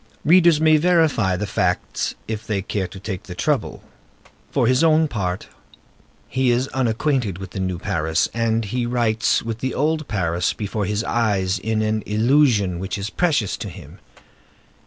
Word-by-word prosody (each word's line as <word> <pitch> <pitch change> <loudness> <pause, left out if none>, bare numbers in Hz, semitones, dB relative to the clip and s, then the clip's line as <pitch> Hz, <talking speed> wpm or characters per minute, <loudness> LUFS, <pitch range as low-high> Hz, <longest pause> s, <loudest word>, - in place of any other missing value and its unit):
Readers 170 -1 +5
may 155 0 +5
verify 155 - +2
the 105 - -2
facts 100 - -1
if 110 -1 -5
they 100 -3 -1
care 100 -1 -2
to 95 +2 -11
take 95 -1 -5
the 95 -4 -9
trouble. - - -1 0.7
For - - +1
his 130 +5 +3
own 160 -1 +4
part, 95 -8 -3 0.8
he 130 -1 +1
is 120 +2 +1
unacquainted 125 - 0
with 95 -1 -8
the - - -5
new 95 -1 -2
Paris, 80 -4 0
and 115 -1 0
he 120 +4 -2
writes 115 -2 +1
with 115 -1 -4
the 130 +2 -3
old 155 +2 0
Paris 90 -4 0
before 105 0 -3
his 105 +3 -1
eyes 100 -6 0
in 110 +2 -1
an 110 0 0
illusion 110 -5 +2
which 95 +2 -4
is 100 +2 -4
precious 145 - +1
to - - -6
him. - - -12
110 Hz, 165 wpm, -21 LUFS, 95-130 Hz, 0.8 s, Readers